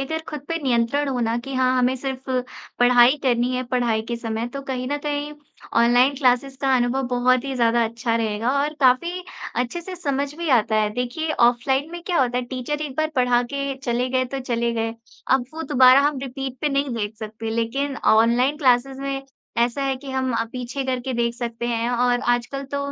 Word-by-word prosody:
अगर 320 +4 -3
खुद 300 -2 -5
पे 330 - -1
नियंत्रण 260 +3 +1
होना 235 -3 0
कि 270 +3 -7
हाँ, 255 0 +2
हमें 255 +1 +2
सिर्फ़ 265 0 -5 0.5
पढ़ाई 245 +2 +6
करनी 245 -1 +1
है 255 - -1
पढ़ाई 235 -3 +1
के 235 - -2
समय 225 0 -3
तो 275 - -4
कहीं 255 -1 -3
न 290 - +1
कहीं 290 0 -2 0.5
ऑनलाइन 245 +4 +4
क्लासेस 265 +1 +1
का 265 -1 +3
अनुभव 245 +2 +1
बहुत 250 +1 +2
ही 275 - -3
ज़्यादा 235 -1 +3
अच्छा 230 +1 -1
रहेगा 225 +1 -1
और 300 +1 -2
काफ़ी 340 +8 +2 0.3
अच्छे 250 +7 -1
से 365 +1 -8
समझ 280 -3 -2
भी 340 -2 -3
आता 215 0 0
है। 215 -1 +2
देखिए 250 +6 -2 0.2
ऑफ़लाइन 265 +5 0
में 345 0 -7
क्या 350 -6 +2
होता 245 -1 +1
है 250 - -2
टीचर 260 +4 -4
एक 285 -2 -6
बार 310 0 0
पढ़ा 245 -1 +3
के 275 -1 -2
चले 245 +1 0
गए 255 0 +1
तो 270 - -2
चले 235 0 0
गए 225 0 -2 0.4
अब 260 -2 +3
वो 325 - -4
दोबारा 255 +1 +7
हम 290 - -4
रिपीट 265 -1 -5
पे 300 - +1
नहीं 275 -3 -1
देख 215 -1 -3
सकते। 220 +1 -6
लेकिन 265 +5 -1 0.2
ऑनलाइन 240 +6 +3
क्लासेस 265 -1 +2
में 275 0 -3 0.4
ऐसा 240 +4 +1
है 270 -1 0
कि 270 0 -9
हम 260 0 -1
अ, 230 0 0
पीछे 255 +2 -4
करके 255 0 -2
देख 235 0 0
सकते 235 -1 -4
हैं 235 0 -1
और 245 0 +2
आजकल 245 +3 -3
तो 280 - 0
255 Hz, 205 wpm, -22 LUFS, 240-275 Hz, 0.5 s, दोबारा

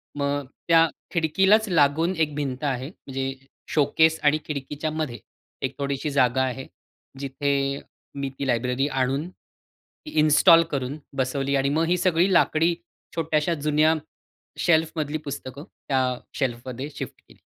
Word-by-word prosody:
मग 140 -1 -1 0.2
त्या 165 -1 +6 0.2
खिडकीलाच 190 +7 +3
लागून 165 +2 +3
एक 155 -2 0
भिंत 135 -2 -3
आहे. 130 -2 -1
म्हणजे 135 -5 -5 0.4
शोकेस 160 +2 +3
आणि 150 +1 +4
खिडकीच्यामध्ये 150 -2 -4 0.4
एक - - -1
थोडीशी 140 +1 -2
जागा 130 -2 +3
आहे. 130 0 -3 0.5
जिथे 140 0 -1 0.4
मी 140 -1 -3
ती 140 - -2
लायब्ररी 125 +3 +1
आणून, 135 +3 -1
ती 305 +10 -19
इन्स्टॉल 155 +3 +6
करून 135 +1 -2 0.2
बसवली 135 +1 0
आणि 135 0 +2
मग 160 +3 +1
ही 180 - +2
सगळी 180 +1 +2
लाकडी 170 0 +3 0.4
छोट्याश्या 160 0 +1
जुन्या 155 +1 +4 0.7
शेल्फमधली 160 -2 +1
पुस्तकं 140 -1 -6 0.2
त्या 135 -2 +2 0.3
शेल्फमध्ये 130 +2 -3
शिफ्ट - - -7
केली. - - -20
145 Hz, 125 wpm, -25 LUFS, 135-160 Hz, 0.7 s, त्या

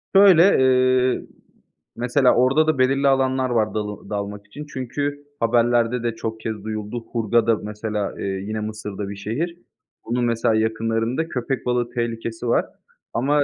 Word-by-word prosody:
Şöyle, 195 -4 +8 0.2
eee, 130 -1 +3 0.7
mesela, 125 +2 +3
orada 135 +6 +3
da 155 -2 +2
belirli 135 +2 +3
alanlar 130 -1 +2
var 110 -3 +1
dalı 105 -2 -5
dalmak 100 0 -5
için 145 +8 -9
çünkü 145 +3 -3
haberlerde 120 +1 +2
de 115 -1 -1
çok 110 0 -5
kez 110 -2 -5
duyuldu. 110 +2 -5
Hurghada, 115 0 +2
mesela, 105 -1 -3
eee, - - -3
yine 100 +3 -3
Mısır'da 105 -2 -5
bir 100 - -6
şehir. 130 - -3 0.5
Onun, 120 +1 -1
mesela, 115 -1 +1
yakınlarında 115 +6 0
köpek 125 -2 -3
balığı 125 -1 0
tehlikesi 115 -1 -3
var. 115 - +2 0.5
Ama, 145 +4 +2
120 Hz, 145 wpm, -22 LUFS, 110-130 Hz, 0.7 s, Şöyle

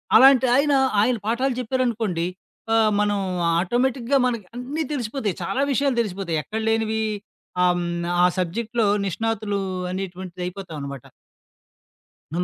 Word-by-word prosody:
అలాంటి 265 +1 +8
ఆయన 285 +2 +3 0.3
ఆయన 245 +4 +3
పాఠాలు 255 +4 +1
చెప్పారనుకోండి. 230 -8 0 0.5
ఆ! - - +5 0.3
మనం 205 -1 +1 0.4
ఆటోమేటిక్‌గా 245 +6 +1
మనకి 235 -5 -3
అన్నీ 275 +6 -3
తెలిసిపోతాయి. 230 - -2
చాలా 265 - -1
విషయాలు 275 -2 +1
తెలిసిపోతాయి. 185 -6 -2
ఎక్కడ 220 +1 -4
లేనివి? 220 0 +1 0.6
ఆహ్, 180 0 +4
హ్మ్, 170 0 -2 0.2
ఆ - - +7
సబ్జెక్ట్‌లో 225 +5 0 0.2
నిష్ణాతులు 215 +1 -1 0.3
అనేటువంటిది 185 -1 -6
అయిపోతామనమాట. 150 -8 -7 1.3
అం 175 +2 0
220 Hz, 115 wpm, -23 LUFS, 185-250 Hz, 1.3 s, అలాంటి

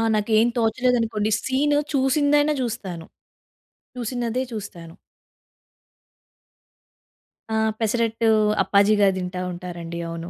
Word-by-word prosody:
నాకేం 215 +2 +3
తోచలేదనుకోండి 225 -2 +1
సీను 290 +3 +1 0.2
చూసిందైనా 290 +2 +2
జూస్తాను. 195 -9 -5 0.9
చూసిందదే 245 +1 -2
చూస్తాను. 175 -6 -8 2.6
ఆ! - - 0 0.2
పెసరట్టు 225 0 0 0.3
అప్పాజీగారు 200 +1 +3
తింటా 180 0 -4
ఉంటారండి. 170 -1 -7
అవును. 165 +1 -6
220 Hz, 75 wpm, -23 LUFS, 190-250 Hz, 2.6 s, నాకేం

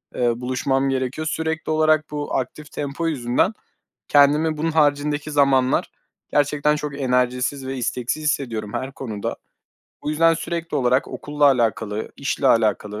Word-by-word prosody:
eee, 120 0 0
buluşmam 135 +2 0
gerekiyor. 135 +4 -2
Sürekli 160 0 -2
olarak 155 -1 +2
bu 145 -1 -3
aktif 145 +4 -4
tempo 145 +3 -3
yüzünden 130 - +1 0.5
kendimi 150 +2 +4
bunun 165 +2 0
haricindeki 150 -1 +1
zamanlar 135 -3 +2 0.4
gerçekten 150 +1 +2
çok 145 -1 -5
enerjisiz 125 +1 0
ve 135 0 -4
isteksiz 125 +4 -2
hissediyorum 115 -8 -2
her 130 +1 -3
konuda. 110 -7 -5 0.7
Bu 150 - -2
yüzden 165 +2 +4
sürekli 165 0 -4
olarak 130 +1 +2
okulla 145 0 -2
alakalı, 110 -5 +1
işle 140 0 -1
alakalı 105 -2 +1
140 Hz, 135 wpm, -22 LUFS, 125-150 Hz, 0.7 s, kendimi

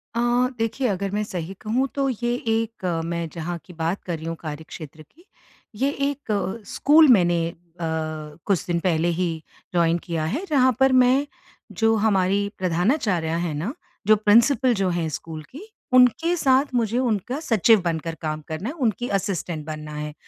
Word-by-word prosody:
अ, - - 0 0.4
देखिए 230 +3 -1
अगर 195 -1 -2
मैं 210 +1 -1
सही 180 -2 -5
कहूँ 245 +5 0
तो 275 -1 +1
ये 240 0 -1
एक 225 -2 -1 0.2
मैं 170 0 -2
जहाँ 170 +1 -4
की 180 - -13
बात 165 +4 -2
कर 175 -2 -3
रही 160 - -9
हूँ 165 - -3
कार्यक्षेत्र 155 0 -8
की, 325 - -21 0.5
ये 270 +6 +1 0.2
एक 220 -6 -3
स्कूल 310 +2 +5
मैंने 175 -8 +4
अ, 170 0 -12 0.6
कुछ 195 -4 +1
दिन 170 -1 0
पहले 170 -2 +1
ही 180 -2 0 0.4
जॉइन 170 -1 +3
किया 170 -2 -3
है, 270 - -2
जहाँ 260 -3 +4
पर 265 0 +5
मैं 255 +2 +4 0.5
जो 225 0 +4
हमारी 200 -2 +2
प्रधानाचार्या 180 - 0
हैं 170 -2 -2
न, 185 - -3 0.3
जो 215 - +7
प्रिंसिपल 235 +5 +4
जो 195 -2 0
हैं 170 -2 -1
स्कूल 155 +1 -6
की, 290 +7 -9 0.3
उनके 255 +8 +5
साथ 270 -1 +2
मुझे 230 -1 +1
उनका 245 +2 -1
सचिव 225 - +4
बनकर 165 -1 -2
काम 155 -1 -3
करना 160 +8 -4
है, 300 - -6
उनकी 245 -4 -1
असिस्टेंट 175 -5 -4
बनना 155 -1 -6
है। 150 0 -5
195 Hz, 170 wpm, -23 LUFS, 170-245 Hz, 0.6 s, जो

